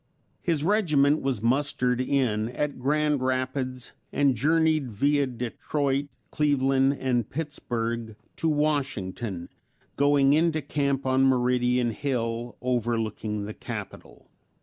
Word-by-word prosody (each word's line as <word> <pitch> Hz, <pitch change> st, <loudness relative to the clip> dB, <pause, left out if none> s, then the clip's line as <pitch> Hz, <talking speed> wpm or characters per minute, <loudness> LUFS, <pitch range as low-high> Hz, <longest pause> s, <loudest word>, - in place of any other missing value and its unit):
His 165 Hz, -5 st, 0 dB
regiment 155 Hz, -7 st, +3 dB
was 130 Hz, -6 st, -1 dB
mustered 125 Hz, 0 st, +1 dB
in 120 Hz, -5 st, 0 dB
at 140 Hz, +2 st, -3 dB
Grand 150 Hz, +1 st, +1 dB
Rapids 130 Hz, 0 st, -2 dB, 0.2 s
and 140 Hz, -2 st, +3 dB
journeyed 155 Hz, +1 st, +2 dB
via 140 Hz, +6 st, +2 dB
Detroit, 135 Hz, +3 st, -2 dB, 0.2 s
Cleveland 135 Hz, -2 st, +2 dB
and 120 Hz, -4 st, 0 dB
Pittsburg 115 Hz, -7 st, -3 dB, 0.2 s
to 165 Hz, -, 0 dB
Washington, 120 Hz, -, -1 dB, 0.5 s
going 140 Hz, -1 st, +4 dB
into 160 Hz, 0 st, +2 dB
camp 140 Hz, -1 st, -1 dB
on 130 Hz, 0 st, +3 dB
Meridian 125 Hz, -1 st, +2 dB
Hill 120 Hz, -2 st, -3 dB
overlooking 115 Hz, -4 st, -1 dB
the 105 Hz, -, -6 dB
capitol. -, -, -8 dB
130 Hz, 105 wpm, -26 LUFS, 120-145 Hz, 0.5 s, going